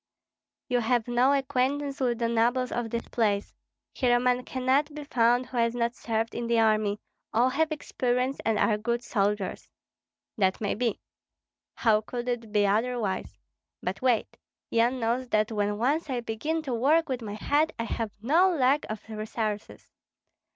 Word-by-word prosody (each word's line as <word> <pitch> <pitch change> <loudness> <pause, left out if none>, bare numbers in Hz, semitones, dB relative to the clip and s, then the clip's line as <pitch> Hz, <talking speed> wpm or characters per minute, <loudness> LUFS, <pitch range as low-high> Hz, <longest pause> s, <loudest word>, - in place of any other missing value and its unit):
"You 250 -2 +1
have 240 0 +1
no 245 +3 +3
acquaintance 275 +1 0
with 245 -3 +1
the 235 0 0
nobles 240 +2 +1
of 235 -1 -2
this 235 +1 -3
place. 210 -3 0 0.4
Here 245 -2 +2
a - - +1
man 250 0 +1
cannot 265 +4 +1
be 300 - -6
found 245 -2 +2
who 250 0 -7
has 230 0 +2
not 235 0 0
served 225 -1 -2
in 235 - -3
the 235 0 +2
army; 215 -2 +2 0.3
all 240 +3 +3
have 315 +4 0
experience 255 -3 -1
and 225 -1 +1
are 210 0 +2
good 235 +2 -1
soldiers." 205 -3 -1 0.7
"That 190 -1 +2
may 205 - -1
be." 230 -1 -1 0.8
"How 215 -3 +3
could 240 +2 -5
it 235 -3 -3
be 205 -1 +3
otherwise? 220 0 -1 0.5
But 190 +2 -3
wait! 250 -4 +1 0.3
Yan 240 +3 +2
knows 240 +2 0
that 215 0 +1
when 205 -1 0
once 285 +8 0
I 250 -2 -1
begin 300 +9 -2
to 265 -4 -3
work 295 +8 +3
with 255 -2 -3
my 210 -2 -5
head 295 +8 +1
I 230 - -2
have 225 -1 -3
no 335 +10 +4
lack 285 -3 +2
of 215 0 -6
resources. 215 -1 -4
240 Hz, 170 wpm, -27 LUFS, 220-260 Hz, 0.8 s, no